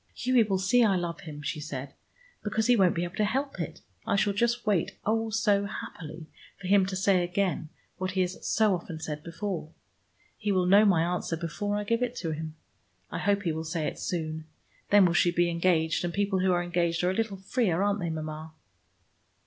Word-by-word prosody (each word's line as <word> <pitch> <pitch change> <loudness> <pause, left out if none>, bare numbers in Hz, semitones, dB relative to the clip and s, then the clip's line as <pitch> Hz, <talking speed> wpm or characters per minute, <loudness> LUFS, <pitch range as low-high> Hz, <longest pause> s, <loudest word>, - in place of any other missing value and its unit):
"Hughie 255 -1 +3
will 205 -3 +1
see 220 +6 +3
I 205 -4 +4
love 170 -2 -2
him," 150 -5 -9
she 150 - -3
said, 140 -2 -6 0.5
"because 215 +1 0
he 245 - +5
won't 190 -5 +4
be 170 - 0
able 175 +1 -6
to 215 - +2
help 270 +2 -1
it. 165 - -5 0.2
I - - 0
shall 205 0 +2
just 235 +3 0
wait, 200 -6 0
oh, 225 +1 +1
so 205 -2 +2
happily, 160 -5 -7 0.3
for - - -10
him 195 0 +4
to 190 - -3
say 185 -1 +3
again 175 -3 -1 0.3
what 185 0 -3
he 190 - +1
has 180 0 -3
so 215 -2 +3
often 170 -2 -5
said 150 -1 -5
before. 170 -1 -4 0.7
He 210 -1 0
will 185 -2 +2
know 200 +4 +6
my 175 -5 +4
answer, 175 -1 -1
before 175 +5 -3
I 210 - -2
give 230 +3 0
it 250 0 -1
him. 155 -1 -4 0.6
I - - -3
hope 200 -1 +1
he 170 - 0
will 160 +1 -3
say 160 -1 -2
it - - -4
soon. 160 -2 -3 0.4
Then 205 -2 +7
we 175 - +2
shall 175 +1 +3
be 175 0 +2
engaged, 170 -2 +1
and 175 - -1
people 200 0 0
who 185 0 +2
are 175 0 +2
engaged 175 -1 0
are 180 - +3
a - - -1
little 220 -1 -1
freer, 190 -2 0
aren't 205 0 +1
they, 170 -2 -2
Mama?" 155 0 -5
185 Hz, 215 wpm, -28 LUFS, 165-205 Hz, 0.7 s, Then